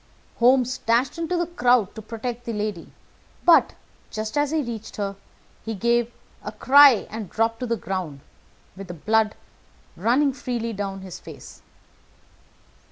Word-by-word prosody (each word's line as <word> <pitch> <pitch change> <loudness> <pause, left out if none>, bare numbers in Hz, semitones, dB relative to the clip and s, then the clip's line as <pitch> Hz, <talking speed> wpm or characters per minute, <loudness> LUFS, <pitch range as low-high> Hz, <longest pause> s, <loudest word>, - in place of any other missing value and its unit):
Holmes 250 +1 +3
dashed 240 +8 +1
into 335 +2 -1
the 345 - 0
crowd 245 - +2
to 220 - -8
protect 235 +2 -6
the 230 - -3
lady; 210 -5 -4 0.5
but, 340 - +5 0.3
just 215 0 -5
as 290 -1 +1
he 315 0 0
reached 230 -3 -7
her, 200 -1 -3 0.5
he 225 0 -4
gave 235 +3 +1 0.3
a - - -5
cry 275 -4 +6
and 215 -3 -6
dropped 225 0 0
to 250 - -3
the 230 0 0
ground, 180 -7 -5 0.5
with 195 0 -9
the 175 - -7
blood 215 +5 +1 0.6
running 270 +4 +2
freely 240 -3 -4
down 195 -1 -4
his 190 -2 -9
face. - - -12
230 Hz, 150 wpm, -24 LUFS, 210-250 Hz, 0.6 s, cry